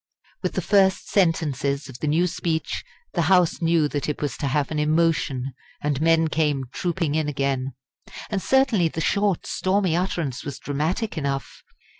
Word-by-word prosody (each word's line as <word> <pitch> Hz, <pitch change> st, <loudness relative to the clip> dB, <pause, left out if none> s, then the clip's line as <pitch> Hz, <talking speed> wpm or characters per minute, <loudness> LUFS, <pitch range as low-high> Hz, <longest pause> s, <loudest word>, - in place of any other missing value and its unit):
With -, -, -2 dB
the -, -, -2 dB
first 190 Hz, -2 st, +3 dB
sentences 145 Hz, -7 st, +1 dB
of 130 Hz, -2 st, -10 dB
the 155 Hz, -, -2 dB
new 160 Hz, +4 st, +3 dB
speech 165 Hz, -2 st, -2 dB, 0.3 s
the 175 Hz, -, +1 dB
House 180 Hz, -2 st, +4 dB
knew 165 Hz, -2 st, +3 dB
that 145 Hz, 0 st, -2 dB
it 150 Hz, -, -2 dB
was 145 Hz, -, -2 dB
to 140 Hz, -, -2 dB
have 140 Hz, +2 st, 0 dB
an 155 Hz, -, -1 dB
emotion, 150 Hz, -4 st, +1 dB, 0.3 s
and 145 Hz, -1 st, -1 dB
men 165 Hz, 0 st, +4 dB
came 150 Hz, -3 st, +1 dB
trooping 170 Hz, -4 st, -1 dB
in 155 Hz, -1 st, 0 dB
again. 135 Hz, -2 st, -1 dB, 0.6 s
And 200 Hz, -2 st, 0 dB
certainly 255 Hz, -10 st, +3 dB
the 160 Hz, -, -5 dB
short 200 Hz, +2 st, +1 dB
stormy 185 Hz, -3 st, +1 dB
utterance 170 Hz, -7 st, -2 dB
was 140 Hz, -2 st, -5 dB
dramatic 160 Hz, -, -2 dB
enough. 140 Hz, -1 st, -3 dB
160 Hz, 165 wpm, -24 LUFS, 145-180 Hz, 0.6 s, House